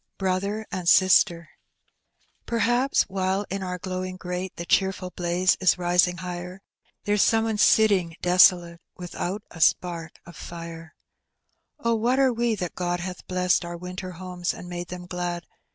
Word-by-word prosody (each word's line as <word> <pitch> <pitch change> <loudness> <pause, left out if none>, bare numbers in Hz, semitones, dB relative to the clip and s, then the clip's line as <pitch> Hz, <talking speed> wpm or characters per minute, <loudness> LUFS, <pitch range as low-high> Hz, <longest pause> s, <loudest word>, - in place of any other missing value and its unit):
BSOTBEB 200 +3 -1
AND 180 -2 -4
8I8TEB, 180 -2 +5 1.0
PerhapB 240 +4 +2
while 190 +1 -1
in 195 0 -3
onr 180 -1 -4
glowing 185 0 -4
grate 180 0 -4
The 170 - -6
cheerful 190 0 0
blaza 175 +1 +1
ia 185 - -4
risiag 180 0 +2
higher. 180 +1 -7 0.4
There's 205 0 +1
Bome 225 -1 +2
one 220 -1 -1
iitting 200 -6 +3
desolate 175 -1 +4 0.2
TTithont 180 +3 -4
a - - -12
Bpark 165 +1 +1 0.2
of 170 - -13
fii«. 165 -1 -9 0.9
Oh, 235 0 +1
what 235 +3 +1
are 265 -2 +3
we, 235 -1 0
that 180 -4 -4
God 175 -1 -2
hath 180 0 -7
blegaed 180 -1 +1
Onr 170 0 -7
winter 180 +1 -6
homes 180 0 -4
and 180 - -10
made 175 0 -5
them 180 0 -8
glad. 175 -1 -4
180 Hz, 150 wpm, -25 LUFS, 175-195 Hz, 1.0 s, 8I8TEB